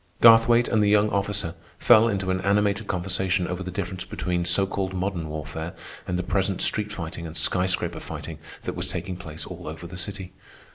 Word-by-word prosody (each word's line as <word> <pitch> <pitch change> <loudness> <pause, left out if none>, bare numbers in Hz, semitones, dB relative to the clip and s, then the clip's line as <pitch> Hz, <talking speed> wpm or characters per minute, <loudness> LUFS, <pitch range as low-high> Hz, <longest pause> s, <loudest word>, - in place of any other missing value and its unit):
Garthwaite 115 +1 +7
and 110 - +2
the 105 - +3
young 105 0 +4
officer 100 -4 -1 0.2
fell 115 -1 +6
into 95 -4 -1
an 95 0 -1
animated 100 +2 +1
conversation 90 0 0
over 90 +1 -4
the 95 - -4
difference 95 0 -4
between 90 -1 -2
so 90 +3 +3
called 95 -1 -3
modern 90 -4 -2
warfare 80 +2 -5 0.3
and 90 - -1
the 90 - -1
present 95 0 0
street 105 -1 +1
fighting 85 -3 -6
and 80 +1 -5
sky 90 +3 +2
scraper 95 - -1
fighting - - -7 0.2
that - - -3
was - - -4
taking 95 - -4
place 80 -3 -7
all - - -9
over 80 +2 -7
the 85 +2 -8
city. 95 0 -4
95 Hz, 195 wpm, -25 LUFS, 85-100 Hz, 0.3 s, Garthwaite